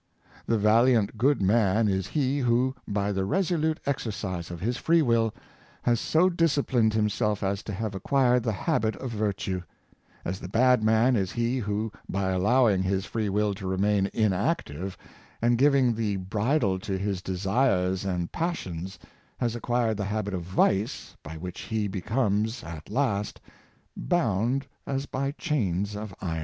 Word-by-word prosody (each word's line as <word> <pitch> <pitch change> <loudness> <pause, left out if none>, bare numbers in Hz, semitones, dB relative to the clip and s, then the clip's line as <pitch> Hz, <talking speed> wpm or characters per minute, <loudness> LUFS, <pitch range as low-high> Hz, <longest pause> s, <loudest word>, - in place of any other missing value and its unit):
The 115 - +2
valiant 110 +1 +3
good 130 +1 +2
man 105 +1 +3
is 95 -2 0
he 140 -2 0
who, 125 +1 +2
by 100 0 -1
the 95 -1 -1
resolute 160 - 0
exercise 105 - -3
of 85 -1 -6
his 115 +7 -1
free 165 +4 +3
will, 115 -3 +2 0.5
has 120 -2 +2
so 165 +8 +3
disciplined 140 -10 +2
himself 105 -1 0
as 100 0 -1
to - - -6
have 105 +1 -3
acquired 125 +5 +2
the 115 -1 -1
habit 110 +3 0
of 130 - -6
virtue; 100 -4 -2 0.6
as 95 +2 -3
the - - -7
bad 125 +3 +3
man 110 +4 +4
is 95 -4 -1
he 120 +2 0
who, 105 0 -2 0.2
by 95 -1 -1
allowing 105 +2 +3
his 95 0 0
free 110 -3 -2
will 105 +1 +1
to 95 -1 -6
remain 100 +1 +1
inactive, 95 - -1 0.4
and 120 0 +2
giving 135 -3 +4
the 110 -2 -1
bridle 100 +2 0
to 95 0 -3
his 100 -1 -2
desires 95 -1 +1
and 90 -3 -2
passions, 95 - -3 0.4
has 120 -2 -1
acquired 120 -2 0
the 100 - -2
habit 105 0 -2
of 90 - -2
vice, 95 +4 0
by 80 +2 -8
which 90 +2 -7
he 110 -2 -2
becomes, 105 +3 -1
at 80 -2 -9
last, 105 -4 -1 0.6
bound 125 - 0 0.2
as 135 0 -2
by 135 0 -2
chains 105 - -1
of 105 0 -6
iron. 80 -3 -2
105 Hz, 155 wpm, -27 LUFS, 95-125 Hz, 0.6 s, man